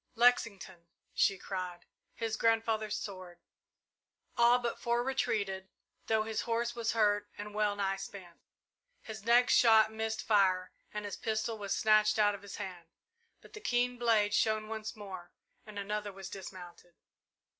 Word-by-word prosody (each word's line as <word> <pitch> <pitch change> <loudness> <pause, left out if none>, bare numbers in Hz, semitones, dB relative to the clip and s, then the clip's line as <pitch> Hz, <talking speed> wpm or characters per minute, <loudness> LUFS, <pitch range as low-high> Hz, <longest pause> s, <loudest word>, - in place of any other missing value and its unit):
"Lexington!" 200 -7 +1 0.3
she 195 - +3
cried. 180 -2 -5 0.3
"His 225 -1 -2
grandfather's 225 -2 +1
sword!" 185 -3 -8 1.0
All 240 +1 +5
but 240 -1 -3
four 240 0 0
retreated, 200 -7 -1 0.4
though 220 -1 +2
his 220 0 -2
horse 235 +1 -1
was 230 -1 -1
hurt 205 -2 +2
and 210 0 -7
well 210 -1 +1
nigh 195 -1 -1
spent. 185 -3 -10 0.6
His 220 -2 -8
next 240 +2 +5
shot 220 -2 +6
missed 220 0 -3
fire 190 -4 +2 0.2
and 210 0 -5
his 205 - -5
pistol 220 +1 -2
was 200 -1 -2
snatched 215 0 +4
out 205 -1 +4
of 200 - -8
his 200 -1 -9
hand, 180 -4 -7 0.5
but - - -17
the 425 - -9
keen 245 - 0
blade 220 -3 +3
shone 215 0 +1
once 220 +2 -5
more 190 -4 -9 0.4
and 210 -1 -9
another 210 +1 -3
was 195 -1 -9
dismounted. 180 -2 -10
210 Hz, 150 wpm, -32 LUFS, 195-225 Hz, 1.0 s, shot